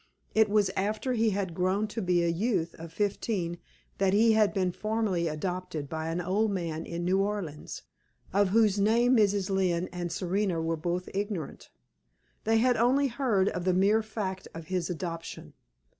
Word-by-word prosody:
It 220 -1 +4
was 205 -2 +3
after 215 +6 -1
he 225 -1 +2
had 195 -3 -2
grown 185 +5 0
to 225 - -4
be 180 -2 +2
a - - +1
youth 170 0 0
of 165 0 -8
fifteen 195 -2 -2 0.4
that 195 -1 +3
he 225 +2 +5
had 215 -2 +4
been 185 -3 0
formally 215 -4 -1
adopted 160 -1 -3
by 160 0 -3
an 165 +2 -2
old 195 +5 +1
man 165 -5 -3
in 170 0 -4
New 185 +2 +2
Orleans, 195 -7 -4 0.5
of 200 +1 +4
whose 210 -1 +3
name 235 +5 +4
Mrs. 200 -3 +2
Lynne 185 -2 +1
and 175 -1 -4
Serena 185 0 -1
were 165 0 0
both 175 +3 -3
ignorant; 195 -5 -4 0.8
they 225 +1 +3
had 245 +2 +3
only 265 +4 +3
heard 230 -7 +1
of 180 - -4
the 185 0 +2
mere 205 +4 +4
fact 200 -4 -5
of 165 -1 -9
his 180 -3 -1
adoption. 165 -1 -6
190 Hz, 175 wpm, -29 LUFS, 175-215 Hz, 0.8 s, he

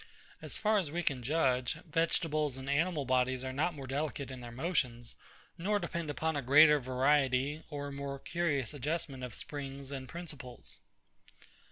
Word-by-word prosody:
As - - -2
far 215 -1 +3
as 175 -6 -2
we 175 +4 -2
can 135 -5 0
judge, 130 -2 +2
vegetables 155 -3 +1
and 130 0 -7
animal 150 +1 +1
bodies 130 0 +2
are 130 0 -3
not 155 +5 0
more 140 -2 -7
delicate 140 0 -3
in 130 -1 -7
their 120 -1 -7
motions, 125 -4 -1 0.4
nor 205 +5 +2
depend 170 -5 -3
upon 160 +2 -1
a 145 - 0
greater 150 +3 +7
variety 135 +2 +2
or 145 -2 -4
more 140 0 -4
curious 145 -5 -1
adjustment 145 -2 -3
of 125 -3 -5
springs 140 -1 -6
and 130 -2 -5
principles. 145 -7 -8
140 Hz, 160 wpm, -33 LUFS, 130-160 Hz, 0.4 s, greater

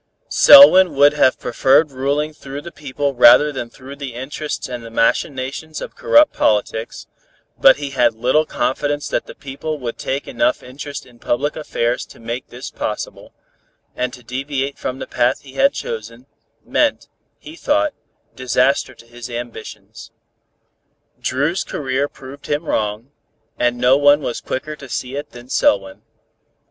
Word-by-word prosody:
Selwyn 190 - +8
would 145 +1 +5
have 130 -3 +3
preferred 140 +5 +2
ruling 140 +4 -1
through 140 -2 -8
the 170 +4 -9
people 145 -1 -3
rather 130 +4 +6
than 125 -4 -6
through 135 +3 -12
the 140 -4 -7
interests 145 +4 -5
and 125 -2 -7
the 115 - -9
machinations 130 +6 -1
of - - -8
corrupt 300 +1 +4
politics, 110 +1 -1 0.5
but 135 - +7
he 140 -1 -5
had 120 -3 +2
little 130 +7 +1
confidence 145 +4 -2
that - - -2
the - - -11
people 145 +3 -6
would 120 -4 -6
take 135 +2 -3
enough 305 0 0
interest 140 +2 -8
in 120 -2 -20
public 145 +6 -1
affairs 120 -6 -2
to - - -15
make 115 +2 -5
this - - -9
possible, - - -5 0.6
and 125 0 -2
to 125 0 -13
deviate 135 +3 -4
from 130 - -4
the - - -6
path 125 +2 0
he 135 -2 -14
had 275 - +3
chosen, 465 +6 -7 0.4
meant, - - 0 0.3
he 315 - -12
thought, 305 -2 0 0.4
disaster 130 +1 0
to 115 - -17
his 120 +1 -10
ambitions. 120 -2 -9 1.1
Dru's 145 +8 -1
career 135 0 -2
proved 140 0 -12
him 150 +3 -2
wrong, 110 +1 -2 0.5
and 120 0 +1
no 125 +2 +4
one 145 +1 +4
was 120 - -4
quicker 155 +4 -5
to 140 -2 -12
see 130 +2 -4
it 145 +1 -5
than 120 0 -13
Selwyn. 95 -6 +1
135 Hz, 155 wpm, -19 LUFS, 125-145 Hz, 1.1 s, Selwyn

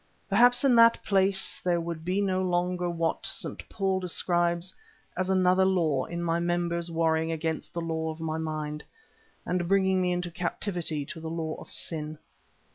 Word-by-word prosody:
Perhaps 245 +1 +5
in 270 -2 +5
that 230 0 +6
place 195 -1 +1
there 175 -1 +2
would 165 -1 -5
be 185 +4 0
no 185 -2 +1
longer 180 -1 0
what 165 -1 -1
St. - - -3
Paul 195 -2 0
describes 175 0 0 0.4
as 185 +1 -1
another 185 0 +4
law 165 -8 +2
in 170 0 -4
my 170 0 +1
members 170 0 -1
warring 160 -1 +1
against 160 0 -3
the 170 - -4
law 160 -1 -2
of 160 0 -6
my 160 0 -2
mind, 155 -1 -4 0.6
and 175 -1 -1
bringing 190 0 +3
me 180 -1 +1
into 175 0 -2
captivity 175 -3 -3
to 160 - -8
the 160 0 -5
law 160 -1 -3
of - - -11
sin. 155 -1 -2
175 Hz, 170 wpm, -28 LUFS, 160-185 Hz, 0.6 s, that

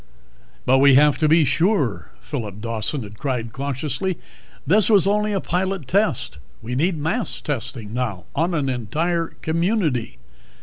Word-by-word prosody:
"But 130 +1 +4
we 140 -1 +6
have 145 0 +5
to 155 - +3
be 160 0 +5
sure," 160 - +1
Phillip 110 -9 -5
Dawson 115 +4 -2
had 105 0 -11
cried 120 -5 -3
cautiously. 140 +6 -3 0.5
"This 195 +8 +3
was 205 -4 +6
only 210 +1 +1
a 200 - 0
pilot 185 -4 -2
test. 185 - 0 0.2
We 120 +3 -4
need 165 +6 +1
mass 165 +11 -1
testing 115 -6 -5
now, 115 -8 -2
on 170 +4 0
an 145 -4 0
entire 155 - -1 0.2
community. 160 - 0
145 Hz, 145 wpm, -22 LUFS, 125-180 Hz, 0.5 s, we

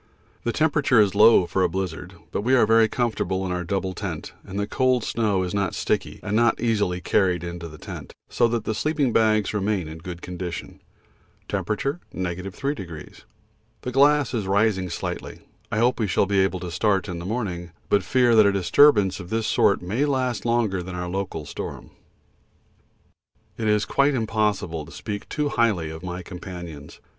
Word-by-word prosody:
The 120 - 0
temperature 145 -4 +3
is 100 -3 +4
low 105 -2 +6
for 95 - -1
a 90 - +3
blizzard, 90 -2 -4 0.2
but - - -1
we 125 +5 +3
are 120 - +5
very 115 0 +5
comfortable 110 -5 -1
in 90 - -3
our 90 0 -2
double 95 +1 -2
tent - - -5
and 95 - -7
the 100 - 0
cold 130 +2 +1
snow 105 -5 0
is 90 - -4
not 100 -2 -1
sticky - - -1
and 105 - -2
not 115 0 +3
easily 105 -6 0
carried 90 -4 +1
into 85 -1 -6
the 75 -1 -11
tent, - - -8 0.2
so 120 - +2
that 115 -1 -1
the 110 - -2
sleeping 145 0 0
bags 110 -2 +3
remain 100 -4 -1
in 80 +1 -8
good 85 +1 -8
condition. 90 -2 -6 0.7
(T. - - -3
3°.) 95 - -4 0.6
The 125 - -3
glass 140 0 +4
is 110 -5 -2
rising 100 -2 +2
slightly. 85 - -5 0.3
I - - -1
hope 120 +3 +2
we 110 - +1
shall 100 - +2
be 100 0 +1
able 95 -1 +1
to 90 -2 -5
start 100 +1 +1
in 90 -3 -5
the - - -7
morning, 90 -5 -3 0.2
but 100 - +3
fear 125 +4 +3
that 110 -2 +7
a - - +4
disturbance 100 +1 +4
of 90 -2 -9
this 115 0 -1
sort 100 -3 +3
may 110 +11 0
last 130 -5 -1
longer 115 -6 +1
than 90 +1 -7
our 90 0 -3
local 95 -5 -4
storm. - - -7 1.6
It 110 - -2
is 105 -1 +2
quite 140 0 +2
impossible 105 -8 -1
to - - -13
speak 100 -1 -6
too 150 -1 -1
highly 100 - +1
of 80 0 -8
my 90 0 -5
companions. 85 -5 -9
100 Hz, 185 wpm, -24 LUFS, 90-115 Hz, 1.6 s, that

